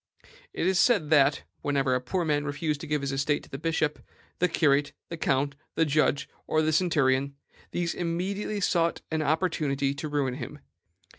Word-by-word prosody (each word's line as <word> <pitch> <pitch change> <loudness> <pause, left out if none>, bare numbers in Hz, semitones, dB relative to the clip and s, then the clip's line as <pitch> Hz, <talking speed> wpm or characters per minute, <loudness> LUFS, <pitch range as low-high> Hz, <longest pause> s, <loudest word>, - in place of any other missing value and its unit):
It - - -2
is 190 0 +3
said 185 -12 +3
that, 145 -2 +4 0.2
whenever 135 -2 +1
a 125 - +1
poor 170 +8 -1
man 145 -2 +1
refused 150 0 -2
to 160 - -6
give 150 -1 0
his 140 0 -2
estate 140 +2 0
to - - -17
the 135 - -5
bishop, 160 -1 0 0.4
the 180 - +3
curate, 145 -3 +2 0.2
the 170 - -4
count, 140 -2 +1 0.2
the 165 - +3
judge, 150 -1 +1 0.2
or 155 0 +2
the 155 0 +1
centurion, 140 -5 +2 0.3
these 175 -1 -1
immediately 190 +5 -2
sought 170 -2 +1
an 160 0 0
opportunity 150 -4 0
to 145 +2 -5
ruin 140 -3 0
him. 145 +3 -7
150 Hz, 175 wpm, -27 LUFS, 140-165 Hz, 0.4 s, that